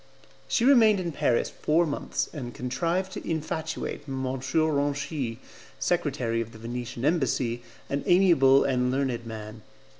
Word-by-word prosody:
She 235 - +1
remained 225 -7 +6
in 175 -2 -2
Paris 145 -5 +1
four 165 +3 +2
months, 145 -2 -2
and 125 -5 -6
contrived 170 +9 -1
to - - -6
infatuate 160 0 -3
M. 135 -1 -3
Ranchi, 140 -1 -1 0.4
secretary 135 -9 0
of 115 0 -7
the - - -11
Venetian 120 +2 -5
Embassy, 130 -6 +1 0.3
an 140 +1 -2
amiable 170 -8 +5
and 125 -2 +1
learned 130 -3 -1
man. 110 0 -8
140 Hz, 130 wpm, -27 LUFS, 125-160 Hz, 0.4 s, remained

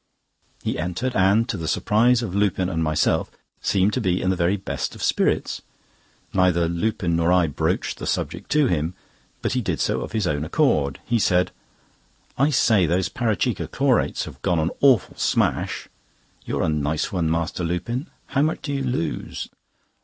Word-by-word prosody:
He - - -2
entered, 90 +10 -2
and 100 +5 +4
to 120 -6 -2
the 80 -2 -4
surprise 115 +7 +3
of 100 -6 -4
Lupin 95 -2 +1
and 80 -3 -1
myself, 75 -1 +1 0.3
seemed 100 +2 +2
to 130 - 0
be 90 -3 +1
in 95 - +1
the - - +1
very 90 +3 +1
best 95 - -4
of - - -7
spirits. - - +1 0.7
Neither 90 -2 +3
Lupin 85 0 -1
nor 85 +1 +2
I 90 -1 +4
broached 75 -4 -1
the - - -5
subject - - -3
to 150 -1 +4
him, 85 - 0 0.5
but - - 0
he 130 - +1
did 90 -8 -2
so - - 0
of - - -6
his 110 -3 0
own 75 -4 0
accord. 70 -2 +1
He 120 -1 +1
said: 90 -3 +2 0.8
"I 140 +3 +3
say, 110 - +3
those 90 +3 +1
Parachikka 110 -3 -1
Chlorates - - +1
have - - -11
gone 85 - +1
an 80 +1 +1
awful 130 -7 +4
smash! - - 0 0.6
You're - - -1
a - - +1
nice 75 0 -1
one, 85 -4 0
Master 85 +2 -1
Lupin. 105 - -2 0.2
How 135 - 0
much 155 +2 0
do 145 - -3
you 135 - -1
lose?" 135 +6 -3
95 Hz, 175 wpm, -23 LUFS, 85-115 Hz, 0.8 s, and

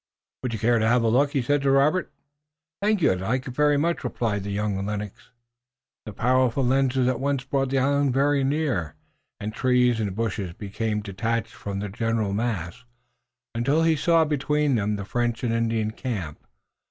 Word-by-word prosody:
"Would 125 - -3
you - - -2
care 115 +2 +2
to 110 - +2
have 120 +1 +3
a - - +2
look?" 140 +5 +2
he 135 -4 +1
said 145 +3 +1
to 140 - +1
Robert. 145 +6 +2 0.7
"Thank 205 -3 +1
you, - - +5
I'd 90 -1 -2
like 125 +7 -1
it - - -4
very 145 +3 +2
much," 170 +4 0
replied 110 -5 -2
young 100 -1 -2
Lennox 105 0 -4
eagerly. - - -26 0.7
The 105 - -6
powerful 130 +3 +2
lenses 130 0 +2
at 130 -2 0
once 140 -1 -1
brought 135 -1 -1
the 135 - 0
island 140 +1 +2
very 140 +2 +2
near, 135 - -1 0.4
and 105 +1 -4
trees 125 -1 +2
and 100 -4 -2
bushes 100 -5 -2
became 105 +2 -3
detached 110 +3 -3
from 100 -1 -6
the 105 - -4
general 115 -1 -1
mass, 110 0 -3 0.7
until 135 +8 +1
he 165 -1 +3
saw 165 +1 +3
between 150 0 0
them 105 -2 0
the 100 -1 -5
French 120 +2 -1
and 115 -2 0
Indian 115 -2 0
camp. 100 - -5
120 Hz, 185 wpm, -25 LUFS, 105-135 Hz, 0.7 s, you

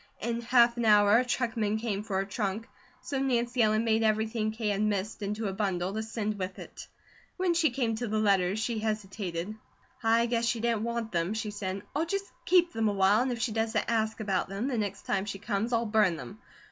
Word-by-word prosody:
In 235 +1 -2
half 235 0 +4
an 235 - 0
hour 210 +1 +6
a - - +2
truckman 230 -4 -1
came 220 -3 -2
for 210 -3 -3
her 195 - 0
trunk, 205 +2 -3 0.3
so 275 - -3
Nancy 245 -2 +1
Ellen 215 0 +3
made 225 -1 +2
everything 220 0 +1
Kate 220 -1 -2
had 200 0 -1
missed 210 0 -1
into 210 +2 -3
a 195 - -3
bundle 190 -2 -1
to 220 - -2
send 215 -2 -3
with 185 0 -4
it. - - -10 0.5
When 365 -2 +2
she 335 -2 +3
came 240 -2 -1
to 240 +1 -3
the 215 0 -1
letters, 195 -2 +2
she 225 0 -1
hesitated. 205 -3 -3 0.5
"I 230 +1 +3
guess 235 -1 0
she 235 - 0
didn't 230 -1 0
want 235 -1 -3
them," 175 +4 -1
she 215 -1 -3
said. 195 -1 -4
"I'll 320 +3 0
just 395 +3 -2 0.2
keep 355 -1 +4
them 225 -1 +1
awhile 200 +2 +3
and 255 0 0
if 240 - -2
she 240 -2 0
doesn't 225 0 0
ask 220 -1 0
about 195 -4 -1
them, 200 +7 -2
the 250 - -1
next 200 -1 -3
time 195 0 -1
she 200 -1 -4
comes, 210 +2 -2
I'll 235 -1 +1
burn 210 -5 +3
them. 200 +6 -9
220 Hz, 220 wpm, -29 LUFS, 205-235 Hz, 0.5 s, hour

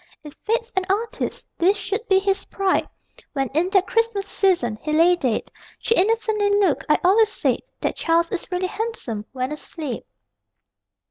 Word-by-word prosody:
If 295 -2 -10
Fate's 460 +5 -2
an 380 - +2
artist, 435 +4 -2
this 380 +5 +4
should 410 +3 -3
be 385 - +4
his 390 0 0
pride 390 -1 0 0.4
When, 270 -3 -1
in 325 +6 +1
that 385 -1 +3
Christmas 455 -3 0
season, 295 - +1
he 305 - -3
lay 335 +3 +5
dead, 255 -10 -2 0.3
She 455 - +1
innocently 435 0 +2
looked. 375 -8 +2
"I 300 - +5
always 420 +4 +5
said - - 0 0.2
That - - -1
Charles 335 0 +1
is 375 - -3
really 360 +1 0
handsome 400 - -4
when 255 +1 -3
asleep." 300 - -5
380 Hz, 160 wpm, -22 LUFS, 310-415 Hz, 0.4 s, lay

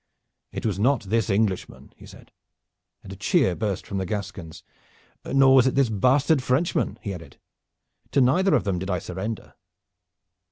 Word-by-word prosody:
"It - - -6
was 100 -3 -1
not 130 +3 +2
this 110 +1 -1
Englishman," 100 -2 -2
he - - -15
said, - - -15 0.7
and - - -9
a - - -8
cheer 90 - +2
burst 100 -3 -3
from 100 - -4
the 95 - -2
Gascons, 95 -5 -6 0.6
"nor 135 0 +4
was 130 -1 +6
it 130 - 0
this 135 -3 +3
bastard 130 +7 +2
Frenchman," 130 +8 0
he 100 - -4
added. 80 -6 -11 0.8
"To - - +3
neither 165 +10 +3
of - - +1
them 95 -4 -1
did 95 +2 -5
I 90 - 0
surrender." 105 +6 -6
110 Hz, 165 wpm, -24 LUFS, 95-130 Hz, 0.8 s, was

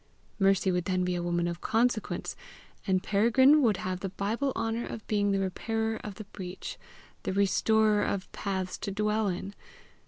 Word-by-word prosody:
Mercy 195 -1 +3
would 180 -1 0
then 185 -1 +1
be 180 - 0
a 175 - -1
woman 175 0 0
of 170 0 -4
consequence, 235 -2 0 0.5
and 185 0 +2
Peregrine 260 +8 +5
would 220 -7 +3
have 185 0 -3
the 195 - -3
Bible 220 +9 -1
honour 225 +1 -1
of 225 - -7
being 205 -1 +1
the 195 - +2
repairer 220 +4 -1
of 205 -2 -6
the 215 - -7
breach, 185 -1 -7 0.4
the - - -2
restorer 210 +2 +3
of 195 -2 -2
paths 190 -2 -3
to - - -3
dwell 210 +1 0
in! 190 +2 -3
200 Hz, 175 wpm, -29 LUFS, 185-220 Hz, 0.5 s, Peregrine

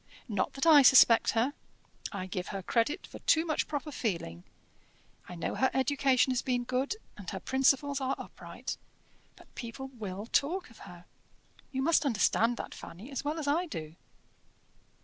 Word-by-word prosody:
Not 205 -5 -1
that 275 - -2
I 310 -3 +8
suspect 255 -3 +7
her 250 +6 +2 0.6
I 200 -3 -4
give 180 -1 -4
her 195 -2 -5
credit 245 - 0
for - - -11
too 320 +1 +3
much 310 -3 -1
proper 300 0 -4
feeling: 165 - -3 0.9
I 180 - -7
know 170 - -3
her 260 - +2
education 265 0 +2
has 255 0 0
been 245 -2 -1
good, 255 - -1 0.2
and 200 -4 -7
her 190 - -5
principles 270 +3 +2
are 265 0 0
upright. - - -7 0.6
But - - -19
people 255 +3 -7
will 210 -5 -6
talk 320 +6 0
of 225 - -17
her. 175 0 -13 0.7
You 265 -1 -2
must 325 +2 +3
understand 235 -2 +2
that, - - -6
Fanny, 205 +11 -10
as 270 - -4
well 300 +3 -2
as 305 -3 -4
I 335 +5 +1
do." 155 - -7
260 Hz, 170 wpm, -30 LUFS, 210-285 Hz, 0.9 s, I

